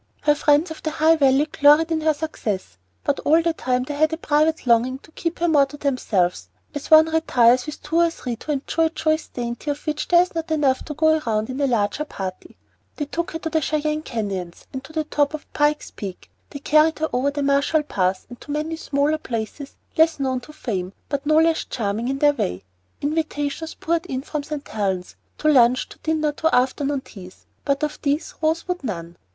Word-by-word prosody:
Her 295 Hz, -, +4 dB
friends 295 Hz, +3 st, +2 dB
of 320 Hz, -, -8 dB
the 315 Hz, -, -2 dB
High 315 Hz, +1 st, +4 dB
Valley 275 Hz, 0 st, +4 dB
gloried 305 Hz, +2 st, +4 dB
in 320 Hz, -1 st, 0 dB
her 310 Hz, -1 st, +2 dB
success; 210 Hz, -, -4 dB, 0.2 s
but 285 Hz, -, 0 dB
all 315 Hz, +3 st, +4 dB
the 335 Hz, 0 st, +1 dB
time 250 Hz, -4 st, -1 dB
they 290 Hz, -, -5 dB
had 310 Hz, +2 st, +2 dB
a 320 Hz, -, -2 dB
private 310 Hz, -1 st, +1 dB
longing 245 Hz, +2 st, +3 dB
to 315 Hz, -, -20 dB
keep 335 Hz, +1 st, -3 dB
her 345 Hz, -, +1 dB
more 290 Hz, -4 st, +4 dB
to 290 Hz, +2 st, -11 dB
themselves, 225 Hz, -11 st, 0 dB, 0.2 s
as 290 Hz, -1 st, -6 dB
one 315 Hz, 0 st, +8 dB
retires 255 Hz, -6 st, +3 dB
with 300 Hz, -, -7 dB
two 320 Hz, +2 st, -1 dB
or 340 Hz, 0 st, +4 dB
three 250 Hz, -7 st, -5 dB
to 300 Hz, -, -5 dB
enjoy 300 Hz, +3 st, 0 dB
a -, -, +2 dB
choice 315 Hz, -1 st, -1 dB
dainty 240 Hz, +4 st, -5 dB
of 290 Hz, 0 st, -4 dB
which 305 Hz, -1 st, -2 dB
there 350 Hz, 0 st, +6 dB
is 360 Hz, -, -9 dB
not 330 Hz, -1 st, -4 dB
enough 285 Hz, -4 st, +1 dB
to 300 Hz, -, -6 dB
go 315 Hz, +1 st, +3 dB
round 220 Hz, +2 st, 0 dB
in 265 Hz, +3 st, -4 dB
a 280 Hz, -, +3 dB
larger 235 Hz, +4 st, 0 dB
company. 190 Hz, -9 st, -7 dB, 0.4 s
They 295 Hz, -, -3 dB
took 340 Hz, +4 st, -3 dB
her 325 Hz, -, -4 dB
to 320 Hz, -, -2 dB
the 315 Hz, -, +1 dB
Cheyenne 305 Hz, +1 st, -1 dB
Canyons 200 Hz, -, -5 dB
and 265 Hz, -, -4 dB
the 310 Hz, +3 st, -3 dB
top 295 Hz, 0 st, 0 dB
of 305 Hz, -, -9 dB
Pike's 295 Hz, 0 st, +1 dB
Peak; 190 Hz, -3 st, -8 dB, 0.2 s
they -, -, -7 dB
carried 305 Hz, +2 st, +3 dB
her 315 Hz, +1 st, -1 dB
over 255 Hz, +3 st, +2 dB
the 285 Hz, 0 st, -3 dB
Marshall 280 Hz, +3 st, +2 dB
Pass 185 Hz, -8 st, -1 dB
and 245 Hz, 0 st, -12 dB
to -, -, -14 dB
many 305 Hz, +2 st, -2 dB
smaller 295 Hz, 0 st, 0 dB
places 235 Hz, +3 st, -5 dB, 0.2 s
less 320 Hz, -1 st, +4 dB
known 260 Hz, -2 st, 0 dB
to 250 Hz, +5 st, -13 dB
fame, 195 Hz, -10 st, -4 dB, 0.2 s
but 280 Hz, 0 st, -3 dB
no 310 Hz, -, +4 dB
less 325 Hz, +1 st, +3 dB
charming 220 Hz, 0 st, -2 dB
in 270 Hz, +1 st, -1 dB
their 290 Hz, +1 st, +4 dB
way. 90 Hz, -, -3 dB, 0.4 s
Invitations 305 Hz, 0 st, -2 dB
poured 335 Hz, +2 st, -1 dB
in 260 Hz, -4 st, -3 dB
from 300 Hz, 0 st, -3 dB
St. 295 Hz, 0 st, -6 dB
Helen's, 190 Hz, -4 st, -2 dB, 0.2 s
to 305 Hz, -, -1 dB
lunch, 255 Hz, -4 st, +4 dB
to -, -, -14 dB
dinner, 310 Hz, -1 st, 0 dB
to 320 Hz, +2 st, +1 dB
afternoon 270 Hz, +2 st, +1 dB
teas; 185 Hz, -7 st, -13 dB, 0.2 s
but 280 Hz, +1 st, 0 dB
of 300 Hz, 0 st, -3 dB
these 290 Hz, +1 st, -1 dB
Rose 320 Hz, +2 st, 0 dB
would 360 Hz, -4 st, -3 dB
none. 170 Hz, -7 st, -5 dB
290 Hz, 215 wpm, -22 LUFS, 250-315 Hz, 0.4 s, one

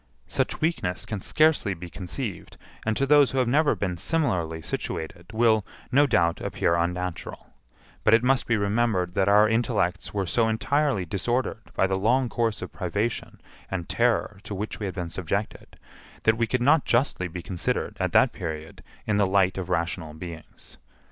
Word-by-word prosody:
Such -, -, -1 dB
weakness 155 Hz, -, -1 dB
can 105 Hz, -3 st, -4 dB
scarcely 155 Hz, -, +2 dB
be 90 Hz, +1 st, -8 dB
conceived, 95 Hz, +4 st, -6 dB, 0.3 s
and 110 Hz, -, +1 dB
to 135 Hz, -, +2 dB
those 145 Hz, -1 st, +6 dB
who 135 Hz, -, -4 dB
have 130 Hz, -2 st, +2 dB
never 145 Hz, +5 st, +3 dB
been 90 Hz, -3 st, -2 dB
similarly 85 Hz, -, 0 dB
situated 85 Hz, +3 st, -5 dB
will, 110 Hz, -1 st, +3 dB, 0.3 s
no 145 Hz, +3 st, +5 dB
doubt, 85 Hz, -8 st, +2 dB
appear 85 Hz, -, 0 dB
unnatural; 90 Hz, +1 st, -3 dB, 0.5 s
but 110 Hz, -, +6 dB
it 115 Hz, -, +2 dB
must 135 Hz, +1 st, +2 dB
be 115 Hz, -, +2 dB
remembered 100 Hz, -3 st, +1 dB
that 100 Hz, 0 st, +2 dB
our 105 Hz, +1 st, +6 dB
intellects 110 Hz, -5 st, 0 dB
were 100 Hz, -2 st, -1 dB
so 115 Hz, +5 st, +2 dB
entirely 135 Hz, -2 st, +1 dB
disordered 110 Hz, +5 st, -2 dB
by -, -, +3 dB
the 95 Hz, 0 st, 0 dB
long 125 Hz, +5 st, +2 dB
course 115 Hz, -3 st, -1 dB
of -, -, -8 dB
privation 100 Hz, +5 st, -3 dB, 0.3 s
and 90 Hz, -3 st, -4 dB
terror 115 Hz, -4 st, +1 dB
to 100 Hz, -, -6 dB
which 105 Hz, +3 st, -5 dB
we 105 Hz, -, -2 dB
had 95 Hz, -, -6 dB
been 85 Hz, -3 st, -4 dB
subjected, 100 Hz, +4 st, -4 dB, 0.5 s
that 110 Hz, -, +4 dB
we 115 Hz, 0 st, 0 dB
could 125 Hz, +2 st, 0 dB
not 145 Hz, +3 st, +5 dB
justly 120 Hz, -7 st, +1 dB
be 90 Hz, 0 st, -7 dB
considered, 90 Hz, -3 st, -2 dB
at -, -, 0 dB
that -, -, +4 dB
period, 80 Hz, -1 st, -6 dB, 0.2 s
in 105 Hz, -2 st, +1 dB
the 100 Hz, -2 st, +3 dB
light 95 Hz, -1 st, +3 dB
of 95 Hz, -2 st, -5 dB
rational 85 Hz, -2 st, -2 dB
beings. 80 Hz, 0 st, -10 dB
100 Hz, 175 wpm, -26 LUFS, 90-120 Hz, 0.5 s, those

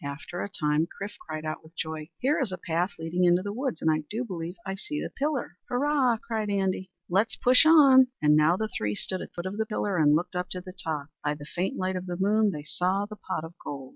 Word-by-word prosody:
After 140 Hz, +5 st, -5 dB
a -, -, -3 dB
time 150 Hz, -3 st, +1 dB
Chrif 200 Hz, +3 st, -7 dB
cried 155 Hz, -1 st, -6 dB
out 155 Hz, -, -3 dB
with 160 Hz, +2 st, -19 dB
joy, 155 Hz, -1 st, -4 dB
"Here 280 Hz, +4 st, +1 dB
is 240 Hz, -8 st, 0 dB
a 185 Hz, -, -3 dB
path 175 Hz, +2 st, -1 dB
leading 165 Hz, +2 st, -1 dB
into 175 Hz, +1 st, +4 dB
the 205 Hz, 0 st, -4 dB
woods. 255 Hz, -, -3 dB
And 160 Hz, -, +4 dB
I 155 Hz, -, +1 dB
do 235 Hz, +4 st, -2 dB
believe 175 Hz, -4 st, -5 dB
I 190 Hz, -, -2 dB
see 300 Hz, +10 st, -4 dB
the -, -, -4 dB
pillar!" 275 Hz, -, -2 dB
"Hurrah!" 260 Hz, -2 st, +2 dB
cried 220 Hz, -1 st, -3 dB
Andy, 190 Hz, -2 st, 0 dB, 0.2 s
"let's 205 Hz, +5 st, +2 dB
push 255 Hz, +5 st, +6 dB
on!" 275 Hz, -5 st, +8 dB
And 150 Hz, 0 st, +5 dB
now 155 Hz, +4 st, +4 dB
the 220 Hz, -, -1 dB
three 105 Hz, -, -2 dB
stood 185 Hz, -, -1 dB
at -, -, -7 dB
the -, -, -49 dB
foot 175 Hz, -, -5 dB
of 190 Hz, +2 st, -4 dB
the 220 Hz, -, 0 dB
pillar 205 Hz, -4 st, -1 dB
and 150 Hz, -1 st, +5 dB
looked 180 Hz, +3 st, -1 dB
up 180 Hz, 0 st, -2 dB
to 185 Hz, -, -4 dB
the 185 Hz, 0 st, -10 dB
top. 160 Hz, -5 st, -3 dB
By 150 Hz, 0 st, 0 dB
the 145 Hz, 0 st, -10 dB
faint 175 Hz, +5 st, -2 dB
light 185 Hz, 0 st, -1 dB
of 185 Hz, 0 st, -4 dB
the 175 Hz, -1 st, -3 dB
moon 210 Hz, +3 st, +3 dB
they 150 Hz, -6 st, -5 dB
saw 185 Hz, +6 st, 0 dB
the 215 Hz, +1 st, -9 dB
pot 160 Hz, -, -4 dB
of 160 Hz, +1 st, -8 dB
gold. 135 Hz, -2 st, -6 dB
185 Hz, 260 wpm, -27 LUFS, 160-215 Hz, 0.2 s, on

